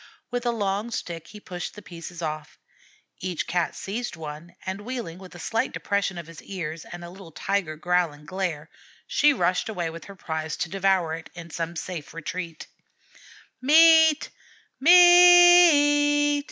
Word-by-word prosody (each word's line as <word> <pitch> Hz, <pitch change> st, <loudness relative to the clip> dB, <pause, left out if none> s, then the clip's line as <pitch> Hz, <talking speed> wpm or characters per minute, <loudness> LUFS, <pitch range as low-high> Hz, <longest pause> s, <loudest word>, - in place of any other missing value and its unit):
With 245 Hz, 0 st, -3 dB
a -, -, +2 dB
long 205 Hz, 0 st, -2 dB
stick 170 Hz, -7 st, -6 dB
he 210 Hz, -, -12 dB
pushed 180 Hz, -3 st, -7 dB
the 210 Hz, -, -12 dB
pieces 170 Hz, 0 st, -9 dB
off. 155 Hz, -2 st, -6 dB, 0.6 s
Each 180 Hz, -2 st, -4 dB
Cat 175 Hz, -1 st, -2 dB
seized 220 Hz, +2 st, -5 dB
on -, -, -14 dB
one, 155 Hz, +3 st, -9 dB
and 190 Hz, +2 st, -5 dB
wheeling, 225 Hz, -7 st, -6 dB
with 185 Hz, -2 st, -13 dB
a -, -, -10 dB
slight 225 Hz, +6 st, -2 dB
depression 200 Hz, -2 st, -2 dB
of 170 Hz, -, -7 dB
the 165 Hz, 0 st, -14 dB
ears 165 Hz, -5 st, -7 dB
and 175 Hz, 0 st, -10 dB
a 170 Hz, -, -9 dB
little 185 Hz, -2 st, -13 dB
tiger 185 Hz, -1 st, -2 dB
growl 175 Hz, +1 st, 0 dB
and 150 Hz, +1 st, -16 dB
glare, 170 Hz, -4 st, -4 dB, 0.3 s
she 295 Hz, 0 st, +3 dB
rushed 180 Hz, -5 st, 0 dB
away 175 Hz, -6 st, -3 dB
with 165 Hz, 0 st, -10 dB
her 200 Hz, -, -12 dB
prize 160 Hz, -3 st, -5 dB
to 160 Hz, -, -3 dB
devour 190 Hz, -4 st, +1 dB
it 165 Hz, 0 st, -8 dB
in 170 Hz, -1 st, -10 dB
some 165 Hz, +1 st, -4 dB
safe 165 Hz, -2 st, -7 dB
retreat. 165 Hz, 0 st, -6 dB, 1.0 s
"Meat! 320 Hz, +2 st, +5 dB, 0.5 s
Meat!" 340 Hz, -4 st, +6 dB
185 Hz, 165 wpm, -24 LUFS, 165-240 Hz, 1.0 s, Meat